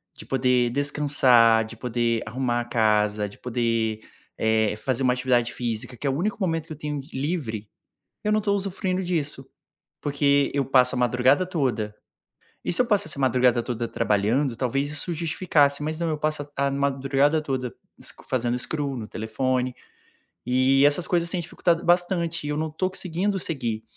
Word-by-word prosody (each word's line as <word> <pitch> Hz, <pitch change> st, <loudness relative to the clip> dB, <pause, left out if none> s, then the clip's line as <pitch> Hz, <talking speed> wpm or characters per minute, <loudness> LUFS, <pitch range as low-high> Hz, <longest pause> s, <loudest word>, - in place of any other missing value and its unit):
de -, -, -11 dB
poder 125 Hz, -2 st, +2 dB
descansar, 130 Hz, -5 st, +4 dB
de 110 Hz, +1 st, -10 dB
poder 115 Hz, -1 st, 0 dB
arrumar 120 Hz, -1 st, -1 dB
a 120 Hz, -, -6 dB
casa, 105 Hz, -2 st, +1 dB
de -, -, -15 dB
poder, 115 Hz, -3 st, -1 dB, 0.4 s
eh, 110 Hz, -1 st, +2 dB
fazer 130 Hz, +4 st, -2 dB
uma 125 Hz, -, +3 dB
atividade 125 Hz, -1 st, +1 dB
física, 120 Hz, +1 st, -4 dB
que 130 Hz, -, -8 dB
é 140 Hz, -, +2 dB
o -, -, 0 dB
único 205 Hz, +4 st, -1 dB
momento 165 Hz, -4 st, -1 dB
que 155 Hz, -, -6 dB
eu -, -, -11 dB
tenho 150 Hz, -1 st, -4 dB
livre, 130 Hz, -, -3 dB, 0.6 s
eu 210 Hz, -, +1 dB
não 215 Hz, -, +3 dB
tô 205 Hz, -1 st, 0 dB
usufruindo 190 Hz, -1 st, -1 dB
disso. 150 Hz, -6 st, -1 dB, 0.5 s
Porque 140 Hz, -1 st, +2 dB
eu 140 Hz, -, +1 dB
passo 130 Hz, -1 st, +3 dB
a 125 Hz, -, -2 dB
madrugada 125 Hz, +7 st, +3 dB
toda 130 Hz, -, -1 dB, 0.7 s
e -, -, +1 dB
se 250 Hz, -, +4 dB
eu -, -, +1 dB
passasse 200 Hz, -, +1 dB
a -, -, -3 dB
madrugada 125 Hz, -2 st, +3 dB
toda 120 Hz, -1 st, -3 dB
trabalhando 115 Hz, +5 st, +1 dB
talvez 135 Hz, +3 st, -1 dB
isso 155 Hz, +3 st, -1 dB
justificasse, 155 Hz, -3 st, +1 dB
mas 155 Hz, +1 st, -3 dB
não, 170 Hz, -1 st, -1 dB
eu 155 Hz, -, -1 dB
passo 155 Hz, 0 st, -1 dB, 0.2 s
a 140 Hz, 0 st, +2 dB
a -, -, -1 dB
madrugada 140 Hz, +2 st, +1 dB
toda 130 Hz, -4 st, -3 dB, 0.3 s
sc -, -, -3 dB
fazendo 120 Hz, -1 st, 0 dB
scroll 140 Hz, -1 st, -2 dB
no 110 Hz, -3 st, -6 dB
telefone. 125 Hz, +3 st, -1 dB, 0.8 s
E 130 Hz, +2 st, +4 dB
essas 150 Hz, +5 st, +3 dB
coisas 170 Hz, -1 st, +1 dB
têm 180 Hz, -2 st, -1 dB
dificultado 170 Hz, 0 st, 0 dB
bastante 175 Hz, -2 st, +1 dB
e -, -, -2 dB
eu 150 Hz, -, -1 dB
não 155 Hz, 0 st, -2 dB
tô 185 Hz, +4 st, -1 dB
conseguindo 190 Hz, +2 st, -1 dB
seguir. 120 Hz, -11 st, -2 dB
135 Hz, 180 wpm, -25 LUFS, 120-155 Hz, 0.8 s, descansar